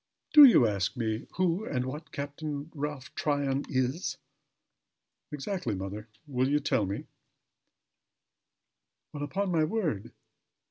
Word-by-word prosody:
"Do 300 -2 +12
you 230 - +7
ask 100 +2 -1
me 110 -1 -2
who 185 +2 +1
and 125 - -2
what 145 +3 -7
Captain 145 +1 -5
Ralph 145 -3 -5
Tryon 140 -2 0
is?" 135 +2 -1 1.1
"Exactly, 150 - -3
mother. 100 +3 -6 0.2
Will 130 -2 0
you 145 +1 +3
tell 105 -8 +1
me?" 100 - -4 2.1
"Well! 145 - -6
upon 190 +6 -1
my 160 -2 +3
word! 155 - -1
140 Hz, 120 wpm, -29 LUFS, 125-155 Hz, 2.1 s, Do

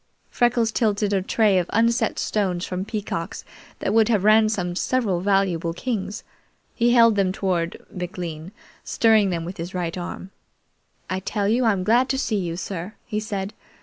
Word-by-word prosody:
Freckles 240 -2 +2
tilted 210 -2 +1
a 195 - +2
tray 200 0 +3
of 175 - -3
unset 230 0 +1
stones 185 -4 -1
from 185 0 -3
Peacock's 205 -5 -4 0.3
that - - -2
would 225 0 +4
have 210 -5 +2
ransomed 215 -4 +3
several 215 -9 0
valuable 185 -4 +1
kings. 210 -2 -3 0.5
He 240 0 +2
held 230 -2 +6
them 195 -2 +2
toward 180 -3 -1 0.2
McLean, 175 -2 -6 0.3
stirring 220 -3 +3
them 170 -2 -2
with 180 +2 -7
his 175 +3 -6
right 170 -2 -2
arm. 185 +1 -6 0.8
"I 185 - -2
tell 200 +1 -2
you 235 +4 +2
I'm 200 -5 +2
glad 240 +6 +3
to 265 - 0
see 225 -5 0
you, 170 -3 -3
sir" 190 +2 -5
he 215 -3 -2
said. 205 -2 -4
200 Hz, 165 wpm, -23 LUFS, 180-220 Hz, 0.8 s, held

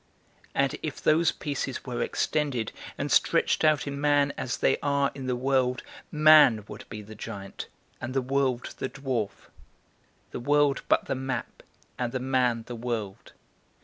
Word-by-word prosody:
And 140 0 +2
if 155 -3 -4
those 160 +2 +3
pieces 140 -3 -4
were 125 -2 -3
extended, 140 -8 -1 0.3
and - - -3
stretched - - +3
out 155 -2 +3
in 140 0 -4
man 145 -1 +3
as 125 - -3
they - - +2
are 140 -1 +1
in 135 -2 -7
the 125 - 0
world, 130 -1 +1 0.3
man 150 -8 +6
would - - -9
be 105 -2 -7
the 110 +2 -11
giant, 100 -2 -7 0.3
and 125 +2 -5
the 135 - +3
world 130 -2 0
the 130 - -2
dwarf; 130 -7 -4 0.8
the - - -5
world 145 +2 +2
but - - +3
the - - -1
map, 130 -2 -4 0.4
and 120 -1 -2
the 130 - -1
man 125 -3 +1
the 120 - -6
world. 115 -4 -5
130 Hz, 160 wpm, -27 LUFS, 120-140 Hz, 0.8 s, man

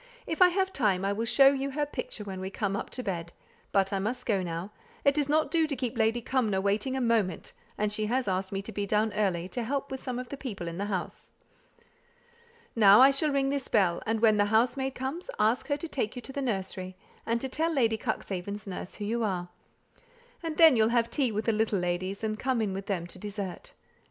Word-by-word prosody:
If 325 - -3
I 365 - +10
have 380 +1 0
time 195 -7 +1
I 200 - +1
will 225 +3 -2
show 270 +3 +7
you 275 0 -2
her 295 +2 -1
picture 250 -6 -6
when 190 -2 -6
we 190 - -3
come 200 0 -2
up 200 - -4
to 250 - -5
bed; 170 -4 -4 0.4
but 195 0 +2
I 195 - +1
must 245 +6 -3
go 200 -5 +1
now. 175 +2 -4 0.3
It 280 - +6
does 290 -1 0
not 310 +1 +2
do 325 -2 +3
to 290 - -2
keep 255 -1 -3
Lady 225 +1 +1
Cumnor 225 -8 +1
waiting 205 +6 0
a - - 0
moment, 225 -8 0 0.2
and 210 0 0
she 215 0 -1
asked 195 -6 0
me 195 0 -3
to 225 - -7
be 205 -2 -3
down 210 +1 +1
early, 190 -5 0
to 245 - -3
help 275 +4 -2
with 265 - -5
some 250 -1 -4
of 250 0 -6
the 280 - -6
people 205 -11 -6
in 170 +2 -5
the 200 - -1
house. 190 -4 -4 1.4
Now 205 -2 +8
I 265 +2 +8
shall 290 +3 0
ring 275 -1 +1
this 280 -2 -2
bell, 185 -5 +2
and 225 0 0
when 215 -2 +5
the 205 - +4
housemaid 250 +5 +1
comes, 280 - -4
ask 220 +4 +2
her 285 -1 0
to 335 - -5
take 250 -8 -2
you - - -4
into 270 - -9
the 280 - -2
nursery, 190 -6 -3 0.3
and 230 +1 0
to 265 - -3
tell 320 +5 0
Lady 230 -7 +2
Cuxhaven's 200 +2 -4
nurse 185 -2 -6
who 205 - -5
you 230 +2 -1
are. 180 -4 -2 0.9
And 325 -2 -4
then 320 -5 +8
you'll 220 -1 +4
have 235 -1 +1
tea 265 -6 +1
with 215 +1 -2
the 225 - +2
little 215 -1 +1
ladies, 185 +3 -2
and 215 -1 -2
come 260 -2 0
in 210 -3 0
with 195 +1 -5
them 180 -4 -1
to 180 - -10
dessert. 205 - -6
220 Hz, 235 wpm, -29 LUFS, 195-265 Hz, 1.4 s, I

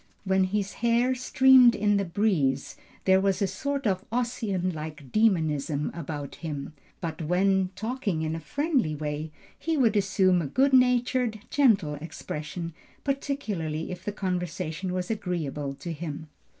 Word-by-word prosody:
When 190 -1 +2
his 200 +1 -2
hair 240 +2 +3
streamed 255 -1 +6
in 205 0 +2
the 200 - 0
breeze 165 -8 0 0.3
there 190 0 +5
was 195 -1 +1
a 200 - +2
sort 275 +9 -3
of 190 -2 +1
Ossian 225 -6 -1
like 150 -3 -7
dæmonism 155 -9 +1
about 150 -4 -6
him. 150 -3 -5 0.3
But, 165 -2 -4
when 185 +3 +2
talking 215 -5 -2
in 160 0 -1
a - - -4
friendly 260 - 0
way, 150 +1 -4 0.3
he 325 -1 -1
would 230 -6 +3
assume 190 -2 +3
a 155 - -3
good 270 - +2
natured, 250 -3 +3
gentle 205 - +3
expression, 160 +2 -6 0.3
particularly 210 - -2
if 180 0 -7
the 205 - -2
conversation 180 -2 -3
was 180 +2 -2
agreeable 150 -9 -3
to 170 +4 -6
him." 155 -1 -6
185 Hz, 145 wpm, -27 LUFS, 160-225 Hz, 0.3 s, streamed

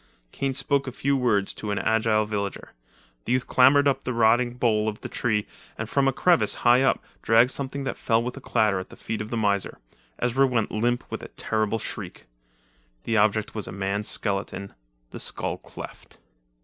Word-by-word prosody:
Kane 135 -1 -2
spoke 140 0 0
a - - -3
few 140 +3 0
words 110 -7 +1
to 105 - -6
an 100 - -1
agile 110 -1 +2
villager. 100 -2 -4 0.5
The 120 - 0
youth 130 0 +1
clambered 140 +3 +5
up 140 - +1
the 125 - -3
rotting 120 +2 +3
bole 110 -3 +1
of 105 - -8
the - - -5
tree 110 -3 0 0.3
and 110 - -4
from 135 +3 +2
a - - +4
crevice, 135 - +3
high 120 +2 +6
up, 135 - +2 0.2
dragged 115 +3 +4
something 140 +1 -2
that 135 - -4
fell 115 -1 +2
with 125 +1 -4
a 140 - -9
clatter 110 -6 +1
at 95 - -8
the - - -13
feet 110 - -4
of 105 - -6
the 120 - -2
miser. 100 -3 0 0.4
Ezra 130 +3 +2
went 120 -4 0
limp 120 +3 0
with - - -4
a - - -8
terrible 110 0 -1
shriek. - - -6 0.8
The 115 - 0
object 110 0 +2
was 105 -3 -5
a - - -6
man's 100 +2 -2
skeleton, 100 -1 -2 0.4
the - - -8
skull - - -3
cleft. - - -11
115 Hz, 195 wpm, -25 LUFS, 105-130 Hz, 0.8 s, high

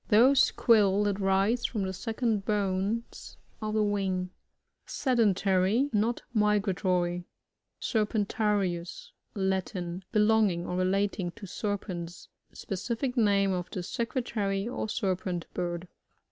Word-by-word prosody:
— - - -39
Those 255 +6 +6
quills 210 -4 +3
that 205 -1 0
rise 195 +5 +2
from 215 -5 -2
the 190 0 -2
second 225 0 -1
bones 205 +2 -2 0.2
of 215 0 -2
the 215 - +3
wing. 190 -3 -1 0.6
Sedbntart. 210 0 +2
— - - -27
^Not 220 +3 +1
migratory. 190 -4 +1 0.6
SBRPEifTARius.^Latin. 190 -3 -1
Belonging 210 -5 +3
or 180 - -3
relating 190 0 0
to 230 - -10
serpents. 180 -4 -5 0.2
Specific 235 +6 -3
name 200 -4 +3
of 180 -1 -2
the 185 - -4
Secretary 215 -3 -2
or 235 -3 -3
Serpent 185 -4 -2
bird. 175 0 -3
200 Hz, 110 wpm, -29 LUFS, 185-220 Hz, 0.6 s, Those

